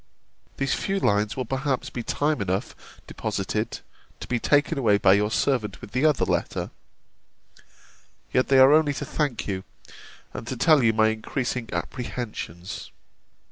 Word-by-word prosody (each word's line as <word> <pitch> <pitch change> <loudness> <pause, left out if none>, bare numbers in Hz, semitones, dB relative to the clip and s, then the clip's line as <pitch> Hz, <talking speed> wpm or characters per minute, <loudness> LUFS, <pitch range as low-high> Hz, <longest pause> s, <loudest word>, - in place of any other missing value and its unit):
These 135 0 0
few 195 0 -1
lines 105 - +1
will 130 - -2
perhaps 135 +2 -2
be 120 - -4
time 145 +4 0
enough 95 0 -2 0.3
deposited, - - -3 0.4
to - - -7
be 120 -1 0
taken 145 +4 +2
away 105 -6 +4
by 95 -1 +5
your 105 +1 +2
servant 110 -4 0
with - - -11
the 130 +6 +1
other 150 -4 +2
letter: - - -2 1.6
yet 130 - +3
they 135 - +4
are 130 +2 +8
only 150 -2 +3
to 145 - -4
thank 140 -6 -2
you, 95 -2 -3 0.7
and 115 - -7
to 130 - -4
tell 155 +3 +5
you 115 - +5
my 110 0 +3
increasing 120 +2 -3
apprehensions. 105 -8 -5
125 Hz, 150 wpm, -25 LUFS, 105-140 Hz, 1.6 s, are